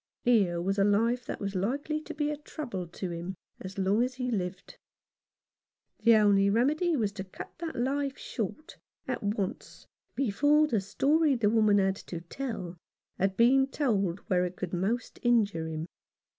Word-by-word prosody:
Here 200 Hz, -9 st, +3 dB
was 195 Hz, +3 st, -1 dB
a -, -, +5 dB
life 230 Hz, +5 st, +2 dB
that -, -, -4 dB
was 200 Hz, -1 st, -3 dB
likely 280 Hz, -, -1 dB
to -, -, -8 dB
be 300 Hz, -1 st, 0 dB
a -, -, -2 dB
trouble 285 Hz, -, -6 dB
to 175 Hz, +1 st, -5 dB
him 170 Hz, +3 st, -5 dB, 0.2 s
as 190 Hz, +1 st, -8 dB
long 195 Hz, +3 st, +2 dB
as 255 Hz, +1 st, 0 dB
he 250 Hz, -1 st, -2 dB
lived. 185 Hz, -4 st, -4 dB, 1.2 s
The 230 Hz, -1 st, +6 dB
only 200 Hz, -2 st, +5 dB
remedy 300 Hz, -, +2 dB
was 215 Hz, -7 st, 0 dB
to 200 Hz, -1 st, -6 dB
cut 185 Hz, -, -10 dB
that 335 Hz, -1 st, -4 dB
life 275 Hz, +2 st, -1 dB
short, 270 Hz, -, -5 dB, 0.3 s
at 255 Hz, -, -2 dB
once, 205 Hz, -2 st, -3 dB, 0.3 s
before 290 Hz, +5 st, +3 dB
the 230 Hz, -9 st, 0 dB
story 285 Hz, -, +2 dB
the 215 Hz, -4 st, +2 dB
woman 215 Hz, -2 st, +4 dB
had 195 Hz, -1 st, +2 dB
to 170 Hz, -, -7 dB
tell 185 Hz, -3 st, -5 dB, 0.4 s
had 195 Hz, 0 st, +1 dB
been 265 Hz, +3 st, +5 dB
told 200 Hz, -, 0 dB
where 180 Hz, -4 st, +1 dB
it 180 Hz, 0 st, -3 dB
could 185 Hz, -1 st, -5 dB
most 210 Hz, +7 st, -2 dB
injure 210 Hz, -9 st, +2 dB
him. 160 Hz, 0 st, -4 dB
215 Hz, 170 wpm, -29 LUFS, 190-265 Hz, 1.2 s, The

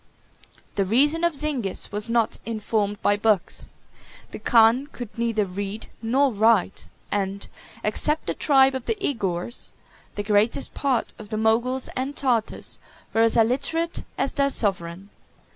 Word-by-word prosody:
The 200 Hz, -, +3 dB
reason 290 Hz, -, +3 dB
of 340 Hz, -2 st, +2 dB
Zingis 275 Hz, -9 st, -2 dB
was 210 Hz, +2 st, 0 dB
not 230 Hz, -1 st, +1 dB
informed 210 Hz, -2 st, -2 dB
by 205 Hz, -, +3 dB
books: 205 Hz, -3 st, 0 dB, 0.6 s
the -, -, -7 dB
khan 235 Hz, +3 st, +4 dB
could 245 Hz, -6 st, -9 dB
neither 230 Hz, -3 st, 0 dB
read 200 Hz, +3 st, -5 dB
nor 260 Hz, +4 st, +2 dB
write; 215 Hz, -2 st, +2 dB, 0.2 s
and, 200 Hz, 0 st, -2 dB, 0.4 s
except 300 Hz, +9 st, 0 dB
the -, -, -1 dB
tribe 270 Hz, -2 st, +4 dB
of 260 Hz, -2 st, -4 dB
the 455 Hz, -, 0 dB
Igours, 230 Hz, -, -2 dB, 0.5 s
the 205 Hz, -, -3 dB
greatest 210 Hz, +5 st, +1 dB
part 265 Hz, -4 st, -1 dB
of 210 Hz, -2 st, -10 dB
the 215 Hz, -, -3 dB
Moguls 235 Hz, +4 st, +1 dB
and 265 Hz, +3 st, -3 dB
Tartars 240 Hz, -5 st, 0 dB, 0.3 s
were 225 Hz, -, +3 dB
as 230 Hz, 0 st, +3 dB
illiterate 280 Hz, +9 st, +1 dB
as -, -, -1 dB
their 280 Hz, 0 st, +2 dB
sovereign. 195 Hz, -5 st, -1 dB
225 Hz, 145 wpm, -24 LUFS, 205-265 Hz, 0.6 s, khan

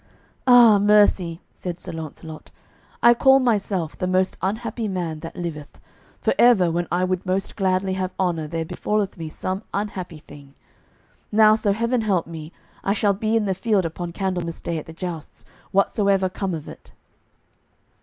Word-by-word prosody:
"Ah, 240 Hz, -4 st, +8 dB
mercy," 200 Hz, -5 st, +3 dB
said 175 Hz, -1 st, -6 dB
Sir -, -, -6 dB
Launcelot, 160 Hz, 0 st, -8 dB, 0.5 s
"I 235 Hz, -, +8 dB
call 265 Hz, +2 st, +5 dB
myself 200 Hz, -9 st, 0 dB
the 185 Hz, -, -3 dB
most 185 Hz, +1 st, +1 dB
unhappy 220 Hz, +3 st, -2 dB
man 175 Hz, -5 st, -3 dB
that 165 Hz, -, -8 dB
liveth; 160 Hz, -4 st, -6 dB, 0.4 s
for -, -, +1 dB
ever 205 Hz, -8 st, +5 dB
when 175 Hz, +1 st, -1 dB
I 180 Hz, +1 st, +1 dB
would 185 Hz, -1 st, -1 dB
most 190 Hz, +1 st, -2 dB
gladly 190 Hz, -1 st, 0 dB
have 185 Hz, 0 st, -2 dB
honour 170 Hz, -4 st, 0 dB
there 165 Hz, +1 st, -3 dB
befalleth 210 Hz, +4 st, -2 dB
me 165 Hz, -3 st, -6 dB
some 185 Hz, +4 st, -4 dB
unhappy 190 Hz, -5 st, -4 dB
thing. 145 Hz, -2 st, -15 dB, 0.8 s
Now, 215 Hz, 0 st, +6 dB
so 215 Hz, -2 st, +1 dB
heaven 230 Hz, +4 st, 0 dB
help 195 Hz, -6 st, +1 dB
me, 160 Hz, -1 st, -8 dB, 0.3 s
I 195 Hz, -, +1 dB
shall 205 Hz, -1 st, +2 dB
be 215 Hz, +3 st, -1 dB
in 215 Hz, -, 0 dB
the 195 Hz, -, 0 dB
field 195 Hz, -1 st, +1 dB
upon 170 Hz, +1 st, -5 dB
Candlemas 175 Hz, -2 st, -3 dB
Day 170 Hz, -2 st, -3 dB
at -, -, -11 dB
the -, -, -8 dB
jousts, 170 Hz, -2 st, -7 dB, 0.3 s
whatsoever 195 Hz, -1 st, +2 dB
come 185 Hz, -1 st, -3 dB
of 155 Hz, -, -8 dB
it." -, -, -12 dB
185 Hz, 165 wpm, -23 LUFS, 170-210 Hz, 0.8 s, Ah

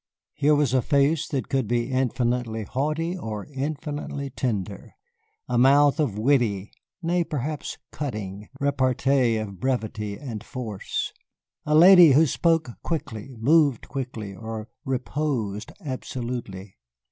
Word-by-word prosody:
Here 150 Hz, +1 st, +3 dB
was 145 Hz, -4 st, +2 dB
a 130 Hz, -, +4 dB
face 145 Hz, +4 st, +2 dB
that 135 Hz, -3 st, -2 dB
could 135 Hz, -4 st, 0 dB
be 120 Hz, +3 st, 0 dB
infinitely 125 Hz, -3 st, 0 dB
haughty 155 Hz, -, -1 dB
or 110 Hz, -, -5 dB
infinitely 145 Hz, 0 st, -4 dB
tender, 105 Hz, -6 st, -3 dB, 0.5 s
a 120 Hz, -1 st, +1 dB
mouth 140 Hz, +3 st, +5 dB
of 130 Hz, -10 st, 0 dB
witty 110 Hz, -5 st, +1 dB, 0.3 s
nay, 175 Hz, +1 st, +2 dB
perhaps 150 Hz, -1 st, -4 dB
cutting 105 Hz, -7 st, -5 dB
repartee 130 Hz, -3 st, +2 dB
of 100 Hz, -4 st, -5 dB
brevity 110 Hz, -4 st, -2 dB
and 115 Hz, -7 st, -6 dB
force. 110 Hz, -6 st, -4 dB, 0.5 s
A 150 Hz, -, +3 dB
lady 175 Hz, -2 st, +9 dB
who 155 Hz, +4 st, +6 dB
spoke 165 Hz, -2 st, +1 dB
quickly, 135 Hz, -6 st, -4 dB
moved 140 Hz, +1 st, +3 dB
quickly, 120 Hz, -7 st, -5 dB
or 110 Hz, +1 st, -6 dB, 0.2 s
reposed 125 Hz, -6 st, -2 dB
absolutely. 120 Hz, -7 st, -5 dB
130 Hz, 120 wpm, -25 LUFS, 110-145 Hz, 0.5 s, lady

